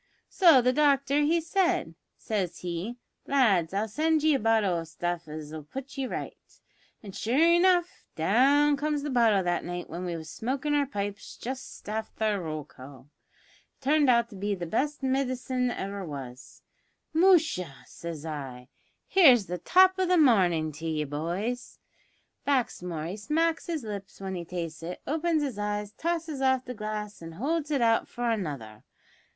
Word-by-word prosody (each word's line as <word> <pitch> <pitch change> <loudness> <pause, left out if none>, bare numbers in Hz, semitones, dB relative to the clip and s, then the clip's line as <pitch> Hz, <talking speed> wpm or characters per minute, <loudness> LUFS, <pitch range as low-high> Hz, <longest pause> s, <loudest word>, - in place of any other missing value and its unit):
So 325 - +6
the 255 +1 +3
doctor 280 0 +3
he 320 +3 +3
said, 350 - 0 0.2
says 195 -6 -2
he, 180 +7 -4 0.3
`Lads, 205 -12 +3
I'll 200 +3 -1
send 310 +6 +1
ye 310 -1 +4
a 275 - +2
bottle 215 -5 +2
o' - - -4
stuff 170 +1 -4
as'll 155 0 -7
put 270 - -8
ye 270 -2 -2
right.' - - -8 0.4
An' 200 - -8
sure 230 +6 -1
enough 345 +2 +3
down 275 - +4
comes 295 0 -1
the 295 - -3
bottle 225 -6 +4
that 175 -1 0
night 175 -1 -6
when 175 +2 -5
we 175 -2 -3
was 160 -1 -9
smokin' 270 - -2
our 290 -1 +2
pipes 205 -5 -5
just 260 -2 -7
afther 215 -1 -2
roll 155 -2 -4
call. 135 +2 -14 0.7
It - - -25
turned 290 0 +3
out 235 -1 +3
to - - -10
be 200 +1 -2
the 175 -2 -5
best 285 - -1
midcine 255 -1 0
ever 200 -2 -4
was. 135 -5 -9 0.5
`Musha!' 315 - +3
says 165 -2 -8
I, 135 -5 -6 0.5
`here's 260 - +7
the 180 -1 -5
top 375 - +5
o' 375 - +3
the 360 0 +4
marnin' 180 - +4
to 165 - -7
ye, 155 -1 -1
boys!' 175 - -4 0.7
Baxmore 180 - -1
he 200 - -6
smacks 325 +9 0
his 325 -6 -3
lips 200 -3 -7
when 190 -1 -5
he 175 -2 -5
tastes 165 -2 -5
it, 175 +2 -6
opens 320 0 0
his 255 -8 -4
eyes, 205 0 -2
tosses 325 -1 -3
off 260 -1 +2
the 250 - -5
glass, 210 -2 -5
and 165 0 -9
holds 300 - -1
it 285 -4 +1
out 225 -1 +3
for 240 0 -4
another. 140 - -4
220 Hz, 170 wpm, -28 LUFS, 175-285 Hz, 0.7 s, `here's